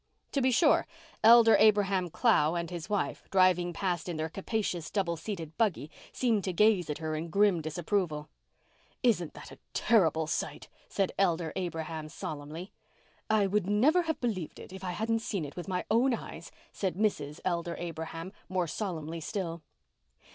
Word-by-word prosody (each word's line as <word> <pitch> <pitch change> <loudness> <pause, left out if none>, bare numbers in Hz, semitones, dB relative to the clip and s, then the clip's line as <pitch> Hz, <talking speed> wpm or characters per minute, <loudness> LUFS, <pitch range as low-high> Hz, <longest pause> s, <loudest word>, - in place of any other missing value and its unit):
To 275 - 0
be 260 - +3
sure, 290 +5 +4 0.4
Elder 230 0 +8
Abraham 200 -4 +4
Clow 170 -6 +3
and 170 0 -3
his 170 -3 -6
wife, 205 -1 -2
driving 185 -2 +3
past 180 0 -2
in 170 - -3
their 160 +1 -2
capacious 195 -3 -2
double 185 -5 0
seated 165 -3 -6
buggy, 185 -9 0 0.2
seemed 225 -6 +1
to 185 - -1
gaze 205 -3 +3
at 150 - -2
her 155 -1 -3
in 160 +2 -3
grim 200 -1 +3
disapproval. 155 -1 -2 0.8
"Isn't 200 -10 +1
that - - -10
a - - -13 0.2
terrible 160 -8 +3
sight?" 155 - -3 0.2
said 195 -2 0
Elder 170 -4 +1
Abraham 160 -3 -4
solemnly. 155 +4 -7 0.6
"I 215 -2 +4
would 195 -1 0
never 265 - +4
have 320 -3 -2
believed 205 -10 -3
it - - -11
if 190 0 -9
I 180 -1 -3
hadn't 225 +4 0
seen 200 -7 -3
it 140 - -9
with 175 - -6
my 180 -1 -2
own 240 +3 +4
eyes," - - -9 0.2
said 190 -3 -2
Mrs. 155 -8 -1
Elder 170 -2 -1
Abraham, 165 +1 -6 0.2
more 185 -1 0
solemnly 165 -2 -4
still. 170 -2 -4
180 Hz, 165 wpm, -30 LUFS, 165-210 Hz, 0.8 s, Elder